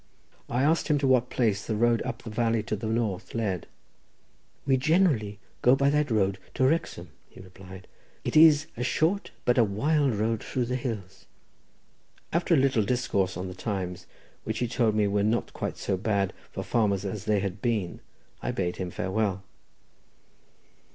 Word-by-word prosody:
I 125 Hz, +3 st, +1 dB
asked 160 Hz, +3 st, +2 dB
him 150 Hz, -3 st, +3 dB
to 140 Hz, -, 0 dB
what 125 Hz, -1 st, +3 dB
place 110 Hz, -4 st, 0 dB
the 110 Hz, -, -2 dB
road 115 Hz, +1 st, +2 dB
up 130 Hz, -2 st, -5 dB
the 115 Hz, -, -7 dB
valley 115 Hz, 0 st, +1 dB
to 105 Hz, -, -2 dB
the 110 Hz, +2 st, -5 dB
north 110 Hz, -4 st, -2 dB
led. 100 Hz, -6 st, -2 dB, 1.0 s
"We 135 Hz, -1 st, +3 dB
generally 135 Hz, -, +2 dB, 0.2 s
go 125 Hz, +2 st, +6 dB
by 140 Hz, +1 st, +2 dB
that 150 Hz, 0 st, +1 dB
road 100 Hz, -4 st, +1 dB, 0.2 s
to 130 Hz, -, +2 dB
Wrexham," 130 Hz, -, -1 dB, 0.2 s
he -, -, -16 dB
replied; 95 Hz, 0 st, -12 dB, 0.4 s
"it -, -, -3 dB
is 155 Hz, -1 st, +7 dB
a 120 Hz, -, -6 dB
short 165 Hz, +10 st, 0 dB, 0.2 s
but 125 Hz, +1 st, +3 dB
a -, -, +7 dB
wild 135 Hz, +6 st, +1 dB
road 110 Hz, +1 st, -1 dB
through 125 Hz, -2 st, -2 dB
the 125 Hz, +2 st, -2 dB
hills." 105 Hz, -7 st, -5 dB, 1.1 s
After 170 Hz, +1 st, +2 dB
a -, -, +3 dB
little 135 Hz, -4 st, +3 dB
discourse 100 Hz, -5 st, 0 dB
on 90 Hz, +1 st, -4 dB
the 90 Hz, -, -6 dB
times, 95 Hz, -3 st, -4 dB, 0.4 s
which 110 Hz, 0 st, -3 dB
he 120 Hz, -, 0 dB
told 115 Hz, -2 st, +1 dB
me 105 Hz, -1 st, +3 dB
were 100 Hz, 0 st, +1 dB
not 110 Hz, +3 st, 0 dB
quite -, -, -4 dB
so 95 Hz, -, -1 dB
bad 100 Hz, -1 st, 0 dB, 0.2 s
for -, -, -5 dB
farmers 105 Hz, -4 st, +1 dB
as 100 Hz, +1 st, -4 dB
they 105 Hz, -1 st, +2 dB
had 100 Hz, 0 st, -4 dB
been, 110 Hz, -7 st, -1 dB, 0.4 s
I -, -, -3 dB
bade, 95 Hz, -8 st, -2 dB
him 90 Hz, -1 st, -3 dB
farewell. 95 Hz, +1 st, -1 dB
110 Hz, 180 wpm, -27 LUFS, 100-130 Hz, 1.1 s, is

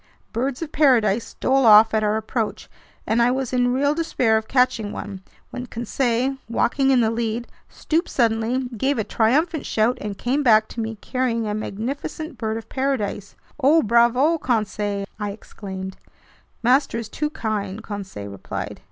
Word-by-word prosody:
Birds 260 Hz, +6 st, -2 dB
of 310 Hz, -, -7 dB
paradise 235 Hz, -7 st, +3 dB
stole 270 Hz, +1 st, +1 dB
off 220 Hz, -1 st, +7 dB
at 215 Hz, 0 st, +2 dB
our 210 Hz, +1 st, +1 dB
approach, 220 Hz, 0 st, -3 dB, 0.4 s
and 230 Hz, +2 st, +2 dB
I 235 Hz, -, +4 dB
was 260 Hz, 0 st, -2 dB
in 245 Hz, -1 st, +2 dB
real 285 Hz, +3 st, +2 dB
despair 300 Hz, -8 st, +1 dB
of 220 Hz, 0 st, -1 dB
catching 250 Hz, -5 st, +1 dB
one 200 Hz, -2 st, -7 dB, 0.3 s
when 250 Hz, 0 st, -6 dB
Conseil, 245 Hz, +2 st, -1 dB
walking 270 Hz, +3 st, +1 dB
in 260 Hz, -2 st, +5 dB
the 220 Hz, -1 st, +2 dB
lead, 230 Hz, +1 st, -2 dB, 0.2 s
stooped 325 Hz, +2 st, -1 dB
suddenly, 235 Hz, +2 st, +1 dB
gave 270 Hz, +6 st, 0 dB
a 220 Hz, -, 0 dB
triumphant 285 Hz, -, +1 dB
shout, 225 Hz, +3 st, +1 dB
and 205 Hz, -2 st, -5 dB
came 265 Hz, +4 st, 0 dB
back 220 Hz, -5 st, +5 dB
to -, -, -8 dB
me, 225 Hz, 0 st, -3 dB
carrying 250 Hz, -3 st, -1 dB
a 210 Hz, -, -2 dB
magnificent 270 Hz, -, -4 dB
bird 220 Hz, 0 st, -2 dB
of 225 Hz, 0 st, -8 dB
paradise. 260 Hz, -7 st, -2 dB, 0.2 s
"Oh 295 Hz, +4 st, +4 dB
bravo, 240 Hz, +8 st, +3 dB
Conseil!" 210 Hz, -5 st, -1 dB
I 210 Hz, -1 st, -2 dB
exclaimed. 190 Hz, -2 st, -8 dB, 0.7 s
"Master 255 Hz, +2 st, +3 dB
is 230 Hz, -2 st, -4 dB
too 300 Hz, +7 st, -2 dB
kind," 215 Hz, -5 st, -3 dB
Conseil 190 Hz, -, -7 dB
replied. 100 Hz, -, -6 dB
230 Hz, 160 wpm, -22 LUFS, 215-265 Hz, 0.7 s, off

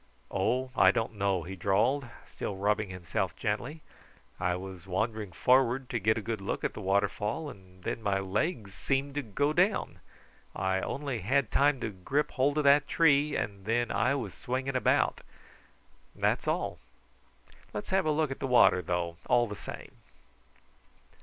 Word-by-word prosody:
"Oh, 125 Hz, +7 st, 0 dB
I -, -, +6 dB
don't 115 Hz, 0 st, 0 dB
know," 100 Hz, -4 st, 0 dB
he 95 Hz, +4 st, -7 dB
drawled, 115 Hz, +9 st, +1 dB, 0.3 s
still 100 Hz, -, -4 dB
rubbing 105 Hz, +1 st, 0 dB
himself 90 Hz, -3 st, -3 dB
gently. 150 Hz, +6 st, -3 dB, 0.6 s
"I 90 Hz, -1 st, +1 dB
was 95 Hz, 0 st, -8 dB
wandering 110 Hz, +1 st, -2 dB
forward 130 Hz, +4 st, +2 dB
to 120 Hz, -, 0 dB
get 110 Hz, +2 st, +2 dB
a 115 Hz, -, -3 dB
good 110 Hz, -2 st, -3 dB
look 100 Hz, -, -3 dB
at -, -, -1 dB
the -, -, -7 dB
waterfall, 105 Hz, +8 st, 0 dB
and 95 Hz, -2 st, -17 dB
then -, -, -3 dB
my 100 Hz, -2 st, +1 dB
legs 100 Hz, -, -2 dB
seemed 135 Hz, +1 st, -1 dB
to 145 Hz, -, -1 dB
go 145 Hz, +6 st, 0 dB
down. 185 Hz, +5 st, +1 dB, 0.6 s
I 95 Hz, +1 st, 0 dB
only 140 Hz, -4 st, -3 dB
had 125 Hz, +4 st, +1 dB
time 140 Hz, -1 st, +3 dB
to -, -, -1 dB
grip 135 Hz, +11 st, -1 dB
hold 140 Hz, +3 st, +1 dB
of 150 Hz, -, +2 dB
that 140 Hz, +1 st, +5 dB
tree, 150 Hz, -2 st, +3 dB
and 100 Hz, -2 st, -3 dB
then 120 Hz, +2 st, +1 dB
I 140 Hz, -, +2 dB
was 110 Hz, -10 st, -4 dB
swinging 130 Hz, +5 st, -3 dB
about. 130 Hz, -, +2 dB, 0.9 s
That's -, -, 0 dB
all. -, -, -1 dB, 0.9 s
Let's 105 Hz, -, -6 dB
have 190 Hz, -4 st, +2 dB
a -, -, +3 dB
look 150 Hz, -1 st, +1 dB
at 135 Hz, -, -5 dB
the 135 Hz, -, -2 dB
water, 120 Hz, -7 st, +5 dB
though, 85 Hz, -1 st, -2 dB
all 120 Hz, -1 st, +4 dB
the 105 Hz, -2 st, -6 dB
same." -, -, -9 dB
115 Hz, 165 wpm, -30 LUFS, 95-140 Hz, 0.9 s, I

